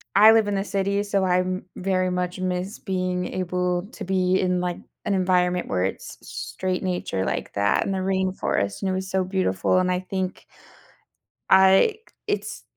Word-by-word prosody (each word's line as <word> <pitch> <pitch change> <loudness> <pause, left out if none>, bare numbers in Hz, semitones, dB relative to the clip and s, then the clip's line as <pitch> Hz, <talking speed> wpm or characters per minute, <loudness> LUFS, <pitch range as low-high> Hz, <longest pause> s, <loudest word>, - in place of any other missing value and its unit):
I 215 +2 +9
live 225 -2 +4
in 205 - 0
the 195 - 0
city, 200 0 0
so 200 -2 0
I'm 185 0 0
very 185 -1 0
much 180 0 -2
miss 185 +2 -3
being 185 -2 -2
able 180 0 -1
to - - -7
be 185 0 +2
in, 180 -1 +1
like, 180 -1 -2 0.3
an 200 - 0
environment 180 -1 +1
where 90 -1 0
it's 95 - -4
straight 185 -1 -4
nature 180 - -2
like - - -3
that 100 0 +2
in 195 - -2
the 190 - -1
rainforest, 185 - -1
and 195 - 0
it - - 0
was 190 0 -3
so 190 -1 +1
beautiful, 185 - +1
and 185 0 +1
I 180 - +1
think 185 0 -4 1.0
I 190 - +5 0.3
it's - - -3
185 Hz, 175 wpm, -24 LUFS, 180-190 Hz, 1.0 s, I